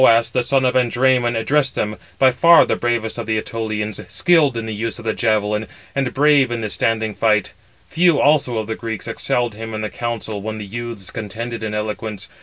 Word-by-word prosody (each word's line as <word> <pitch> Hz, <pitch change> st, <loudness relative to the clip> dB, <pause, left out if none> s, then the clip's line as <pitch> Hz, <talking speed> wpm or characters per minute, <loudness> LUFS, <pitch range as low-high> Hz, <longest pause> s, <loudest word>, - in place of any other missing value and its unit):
Then -, -, +8 dB
Thoas, 115 Hz, 0 st, +1 dB
the 125 Hz, -, +1 dB
son 130 Hz, +2 st, +1 dB
of 125 Hz, -, +2 dB
Andræmon, 125 Hz, -1 st, +2 dB
addressed 135 Hz, +4 st, +1 dB
them, 105 Hz, 0 st, -2 dB, 0.2 s
by 130 Hz, -1 st, +5 dB
far 170 Hz, +7 st, +6 dB
the -, -, 0 dB
bravest 120 Hz, -1 st, -2 dB
of 115 Hz, -, -5 dB
the 110 Hz, -1 st, +1 dB
Ætolians, 110 Hz, -1 st, -4 dB
skilled 155 Hz, -8 st, +3 dB
in 115 Hz, -, -3 dB
the 110 Hz, -, -4 dB
use 115 Hz, +2 st, -3 dB
of 115 Hz, -, -11 dB
the 110 Hz, -, 0 dB
javelin, 105 Hz, -2 st, 0 dB, 0.3 s
and 135 Hz, -2 st, -1 dB
brave 145 Hz, -2 st, +4 dB
in 120 Hz, -1 st, -3 dB
the 110 Hz, -2 st, -3 dB
standing 110 Hz, -1 st, 0 dB
fight; 105 Hz, -3 st, +1 dB, 0.4 s
few 170 Hz, -2 st, +3 dB
also 140 Hz, -5 st, +3 dB
of 110 Hz, -, -2 dB
the 110 Hz, -, -3 dB
Greeks 110 Hz, -3 st, -6 dB
excelled 120 Hz, -2 st, -1 dB
him 110 Hz, +1 st, -7 dB
in 110 Hz, -, -3 dB
the 110 Hz, -, -4 dB
council 115 Hz, -3 st, -4 dB
when 110 Hz, +1 st, -4 dB
the 105 Hz, -, -6 dB
youths 115 Hz, -2 st, -7 dB
contended 115 Hz, +2 st, -5 dB
in 110 Hz, -1 st, -3 dB
eloquence. 105 Hz, -1 st, -4 dB
115 Hz, 210 wpm, -20 LUFS, 110-125 Hz, 0.4 s, Then